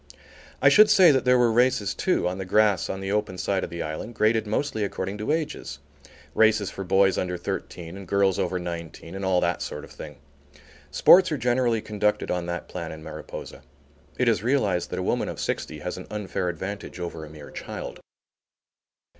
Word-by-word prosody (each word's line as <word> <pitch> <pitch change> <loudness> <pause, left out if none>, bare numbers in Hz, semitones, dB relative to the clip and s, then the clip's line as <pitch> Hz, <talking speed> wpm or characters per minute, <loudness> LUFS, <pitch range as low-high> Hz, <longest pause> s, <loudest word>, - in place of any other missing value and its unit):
I - - +8
should 215 0 +7
say 180 -4 +7
that 130 -2 +1
there 125 0 +5
were 120 -2 +4
races 120 -3 +2
too, - - 0
on 90 +1 -3
the - - -2
grass 100 0 +2
on 95 - -4
the 95 0 -3
open 105 -3 -1
side 95 +1 -1
of - - -4
the 85 0 -4
island, 80 +9 -6
graded 110 0 +2
mostly 110 0 -1
according 100 0 -4
to 105 +7 -1
ages, 150 - -3 0.6
races 110 -3 +3
for 95 - -6
boys 95 +1 +3
under 90 -1 -2
thirteen 85 0 -5
and 95 -2 -9
girls 100 -1 +2
over 90 - 0
nineteen 85 -1 -7
and 95 0 -5
all 95 -1 +2
that - - 0
sort - - -5
of - - -12
thing. 75 -3 -10 0.7
Sports 185 0 +6
are 150 - 0
generally 120 -2 +1
conducted 105 0 0
on 90 -1 -2
that 85 0 -4
plan 85 -3 -6
in 80 0 -9
Mariposa. 80 0 -8 0.6
It - - +1
is - - +3
realized 105 -8 +1
that - - -4
a - - -2
woman - - 0
of - - -6
sixty 80 - -3
has 90 +3 -4
an 90 - -9
unfair 100 -3 -3
advantage 95 +3 -6
over 85 -2 -5
a 75 - -9
mere 75 -1 -11
child. - - -7
95 Hz, 195 wpm, -25 LUFS, 90-110 Hz, 0.7 s, I